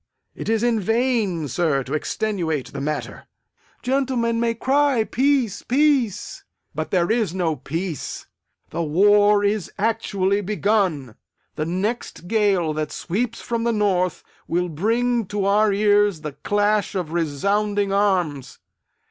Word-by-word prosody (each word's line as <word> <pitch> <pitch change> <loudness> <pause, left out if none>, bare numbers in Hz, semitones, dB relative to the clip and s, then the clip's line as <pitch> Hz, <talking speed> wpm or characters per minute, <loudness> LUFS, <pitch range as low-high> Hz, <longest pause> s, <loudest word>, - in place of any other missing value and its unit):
It - - -6
is 225 0 +1
in 235 -2 +2
vain, 225 - 0
sir, 140 -1 0
to 130 - -6
extenuate 160 -3 -2
the 140 - -5
matter. 150 +1 -4 0.6
Gentlemen 250 -3 0
may 230 0 0
cry, 270 0 +2
Peace, 255 -4 +1
peace! 275 - +1 0.3
but - - -4
there 175 0 +1
is 220 -7 0
no 170 -4 0
peace. 160 +3 -5 0.5
The - - -2
war 205 +6 +4
is 205 -1 0
actually 205 -2 0
begun! 195 - 0 0.4
The 155 - -2
next 190 0 -3
gale 195 -7 +2
that 150 -1 -3
sweeps 225 +10 -3
from 230 -1 -2
the 235 - +1
north 190 -5 0 0.2
will 175 +1 0
bring 230 +7 0
to 205 0 -2
our 210 +1 +3
ears 205 -3 +3
the 150 -1 -5
clash 205 +4 0
of 175 -5 -3
resounding 200 +6 0
arms! 175 -10 0
205 Hz, 130 wpm, -22 LUFS, 170-225 Hz, 0.6 s, war